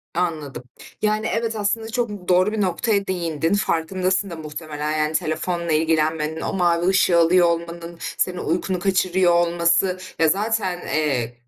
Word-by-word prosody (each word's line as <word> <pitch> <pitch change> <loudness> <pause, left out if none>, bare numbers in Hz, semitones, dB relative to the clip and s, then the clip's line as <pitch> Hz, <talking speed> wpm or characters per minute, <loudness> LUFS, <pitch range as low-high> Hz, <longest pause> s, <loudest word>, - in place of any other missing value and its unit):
Anladım. 155 -7 -2 0.4
Yani, 215 +1 +1
evet, 225 0 -1
aslında 220 +2 -1
çok 215 -6 -3
doğru 185 +3 +3
bir 215 -1 -1
noktaya 200 +2 0
değindin. 165 -2 -1
Farkındasın 185 0 0
da 170 - -6
muhtemelen, 155 -1 -4
yani 155 0 0
telefonla 170 +2 -2
ilgilenmenin, 160 0 +1
o - - -3
mavi 175 -2 +2
ışığı 190 -2 +4
alıyor 175 +1 +5
olmanın, 170 0 -4 0.2
senin 180 -1 0
uykunu 180 +3 -1
kaçırıyor 185 -2 +2
olması. 170 +2 +2 0.2
Ya, 165 - +4
zaten, 200 -2 0
eee, 135 -7 0
175 Hz, 140 wpm, -22 LUFS, 160-190 Hz, 0.4 s, alıyor